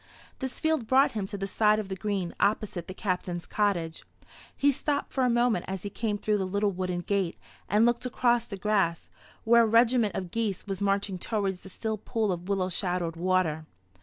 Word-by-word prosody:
This 265 -2 -4
field 315 -7 0
brought 265 +3 +5
him 205 -3 -3
to 200 - -5
the 195 - -3
side 210 +2 +3
of 215 -2 -3
the 190 - -4
green 195 -3 -2
opposite 200 -4 0
the 185 - -6
Captain's 180 -3 -2
cottage. 175 -6 -1 0.5
He 285 - +4
stopped 285 +2 -2
for 265 - +1
a 250 - +3
moment 240 -5 +2
as 190 -1 -4
he 205 - -5
came 210 0 -2
through 210 0 0
the 190 - -1
little 200 +2 +1
wooden 180 -1 -2
gate, 190 -1 -1 0.3
and 210 +3 +4
looked 240 +1 +1
across 240 -1 +2
the 200 - -6
grass, 195 -5 0 0.3
where 235 +1 +6
a 230 - +4
regiment 230 -3 +3
of 180 -2 -4
geese 220 -5 -2
was 195 -1 -4
marching 195 -1 0
towards 195 -3 -2
the 190 - -11
still 220 +2 -3
pool 215 -1 -1
of 180 +1 -5
willow 190 -2 +1
shadowed 180 -3 -1
water. 165 -3 0
200 Hz, 200 wpm, -28 LUFS, 185-225 Hz, 0.5 s, where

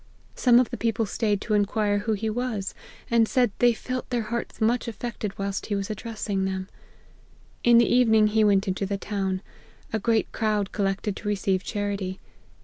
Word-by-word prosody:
Some 245 -2 +5
of 250 - +1
the - - -4
people 225 -1 0
staid 210 -1 0
to 215 - -2
inquire 205 0 +2
who 220 +2 -1
he 215 +2 -2
was, 220 -3 -2 0.4
and 230 -1 +4
said 245 -4 +3
they 245 0 +6
felt 255 +2 -4
their 240 -2 0
hearts 235 - -4
much 235 +2 +1
affected 230 -2 -5
whilst 195 0 -3
he 205 - -1
was 200 +1 -2
addressing 210 -2 -3
them. 190 0 -3 0.9
In 240 -1 +6
the 235 - +6
evening 220 -3 +4
he 215 +1 +3
went 200 -2 +3
into 190 +1 -1
the 200 0 -2
town. 195 -2 -2 0.5
A 220 - +1
great 225 +1 +1
crowd 210 -3 0
collected 195 0 -1
to 205 - -7
receive 195 -2 0
charity. 200 -3 -3
210 Hz, 180 wpm, -26 LUFS, 195-230 Hz, 0.9 s, they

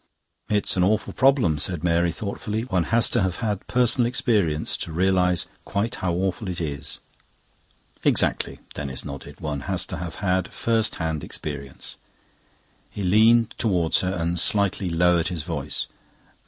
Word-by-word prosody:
"It's 105 -1 +2
an 90 - +3
awful 105 +3 +1
problem," 130 - +3
said 85 +1 0
Mary 85 0 +2
thoughtfully. 105 +3 -4
"One 95 -8 0
has 115 0 +4
to 120 - +2
have 95 -2 0
had 105 -3 -3
personal 125 0 +3
experience 100 -11 +1
to 85 - -5
realise 90 0 +2 0.2
quite 105 +4 -2
how 90 -2 0
awful 95 +3 -1
it 90 -2 -3
is." 75 -4 -4 1.1
"Exactly." - - +2 0.2
Denis 70 -3 -4
nodded. 70 -2 -8
"One 75 -2 -3
has 95 -2 +1
to 95 - -6
have 85 0 -6
had 95 -2 0
first 115 -1 0
hand 80 -3 -2
experience." 70 -3 -6 0.9
He 100 - -6
leaned 110 +4 +4
towards 90 -7 +2
her 95 +1 -1
and 85 +1 0
slightly 100 0 +2
lowered 85 0 +3
his 85 -4 -3
voice. 75 -4 -2
90 Hz, 150 wpm, -24 LUFS, 85-105 Hz, 1.1 s, has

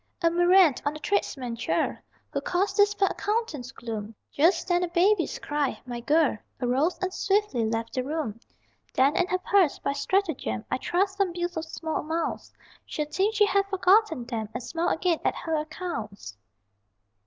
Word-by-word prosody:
A 335 - +4
murrain 350 -2 +6
on 290 - 0
the - - -7
tradesman 265 - -1
churl 230 - 0 0.4
Who - - -2
caused 370 +3 0
this 410 0 +5
fair 390 -1 +2
accountant's 410 - -2
gloom! 220 -4 -6 0.2
Just 330 +6 +3
then 355 -1 +2
a - - 0
baby's 350 +1 +2
cry 290 -2 -2
my 240 -1 -5
girl 290 -2 +2 0.2
Arose 270 +7 +1
and 370 0 -1
swiftly 390 - +1
left 225 +1 -2
the 255 - -1
room. 280 -6 -3 0.6
Then 275 +3 +4
in 360 - +2
her 370 - +1
purse 370 -4 +2
by 280 - -2
stratagem 285 - -1
I - - 0
thrust 390 +6 0
some 390 -3 +1
bills 350 0 -3
of 320 0 -3
small 320 0 -4
amounts 320 +2 -3 0.3
She'll 300 - -3
think 390 +8 0
she 415 0 +5
had 395 0 +2
forgotten 385 - +3
them, 225 -3 -4
And 245 - -4
smile 335 +5 -1
again 340 -1 +1
at - - +1
her 325 - -4
accounts! 300 - -5
325 Hz, 175 wpm, -27 LUFS, 255-375 Hz, 0.6 s, murrain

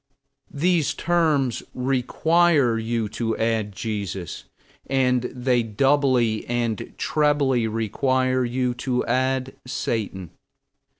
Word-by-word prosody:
These 155 -1 +1
terms 155 -9 +1
require 135 +1 +2
you 115 -1 -1
to 115 +1 -2
add 110 -2 0
Jesus. 100 -4 -5 0.4
And 125 -2 +1
they 125 -1 0
doubly 120 -1 +2
and 120 -2 -2
trebly 145 -6 +1
require 130 +4 0
you 125 +1 -1
to 125 0 -2
add 130 0 0
Satan. 105 - -3
125 Hz, 95 wpm, -23 LUFS, 115-135 Hz, 0.4 s, require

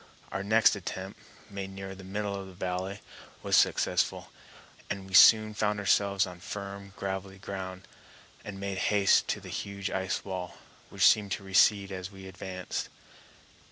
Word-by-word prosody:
Our 95 - -2
next 110 +2 +4
attempt, 95 0 -6 0.3
made 100 -1 -5
nearer 95 0 -7
the 95 0 -11
middle 100 +2 -3
of 100 -1 -6
the 95 - -12
valley, 95 +2 -3 0.4
was - - +2
successful, - - +2 0.6
and 100 -1 -4
we 95 - -13
soon 110 +2 +8
found 105 -1 0
ourselves 100 -1 +2
on 90 -2 -10
firm 100 +1 -7
gravelly 95 0 -4
ground, 95 -1 -7 0.6
and 100 -2 -7
made 100 -1 -3
haste 100 -2 +4
to - - -1
the - - -11
huge 100 -1 -4
ice 95 0 -2
wall, 90 -2 -5 0.3
which - - +2
seemed 105 -3 +4
to 100 - -5
recede 100 +1 +4
as 95 -1 -5
we 95 -1 -11
advanced. 95 0 -5
95 Hz, 160 wpm, -29 LUFS, 95-100 Hz, 0.6 s, soon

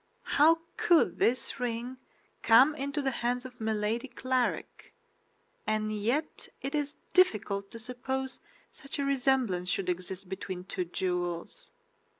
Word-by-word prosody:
"How 320 +3 +5 0.2
could 345 -2 +4
this 255 +3 +1
ring 245 +1 -3 0.4
come 255 +7 +7
into 280 0 -3
the 270 - +1
hands 245 +1 -1
of 250 -2 -10
Milady 220 +3 0
Clarik? 255 - -2 0.7
And 215 0 0
yet 240 +9 -1
it 275 - -4
is 295 -1 -1 0.2
difficult 205 - +3
to - - -9
suppose 255 +3 -3 0.3
such 275 - -6
a 280 - 0
resemblance 255 -9 +1
should 185 0 0
exist 185 +1 -4
between 185 -1 -5
two 185 -1 -3
jewels." 175 - -3
245 Hz, 130 wpm, -30 LUFS, 200-270 Hz, 0.7 s, come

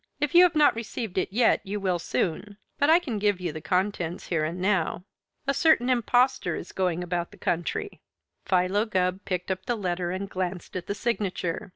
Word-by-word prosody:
"If 295 0 -1
you 350 - +9
have 355 - +1
not 300 -1 +5
received 225 -3 -3
it 185 - -2
yet 230 +3 +3
you 205 +2 -4
will 185 -3 0
soon, 190 +4 -2 0.2
but 285 - +3
I 325 - +8
can 255 -12 -3
give 205 -2 +1
you 175 -3 -3
the 155 - -7
contents 180 +1 -1
here 165 -3 +1
and 165 +4 -3
now. 185 -2 0 0.4
A 275 - +1
certain 275 -3 +3
impostor 245 +2 +2
is - - -7
going 180 -2 -1
about 175 -1 -2
the 205 - -16
country 175 - -2 0.2
" - - -54
Philo 185 +3 +2
Gubb 185 -2 0
picked 180 0 -2
up 190 0 -4
the 240 - 0
letter 175 -3 -2
and 190 +2 -3
glanced 185 -1 -4
at 180 - -4
the 200 - -2
signature. 200 -6 -2
190 Hz, 205 wpm, -26 LUFS, 180-230 Hz, 0.4 s, you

